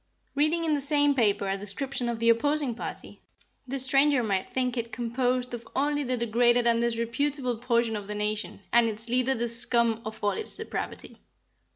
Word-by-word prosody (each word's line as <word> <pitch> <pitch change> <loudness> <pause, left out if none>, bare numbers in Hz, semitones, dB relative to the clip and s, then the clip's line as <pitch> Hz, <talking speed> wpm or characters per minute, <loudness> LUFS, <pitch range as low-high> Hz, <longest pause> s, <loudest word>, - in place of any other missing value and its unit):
"Reading 310 +4 +2
in 315 - +1
the 290 - 0
same 290 0 +3
paper 210 -6 +2
a 195 0 -1
description 240 +5 -1
of 235 - -2
the 230 +1 +2
opposing 280 +3 +2
party, 230 - -8 0.5
the 270 +2 -3
stranger 275 0 +3
might 195 -3 -1
think 255 -1 -1
it 235 -1 -3
composed 250 +1 -1
of 235 -1 -7
only 290 +1 0
the 255 -1 -2
degraded 240 +1 +2
and 235 0 +3
disreputable 240 +2 -1
portion 235 -2 +1
of 205 -1 -6
the 210 - -5
nation, 210 +1 -3
and 235 -1 +5
its 220 +2 -5
leader 255 +2 +1
the 235 +1 -1
scum 235 -1 +2
of 220 0 -8
all 205 - +2
its 440 - -2
depravity. - - -6
240 Hz, 185 wpm, -27 LUFS, 230-270 Hz, 0.5 s, and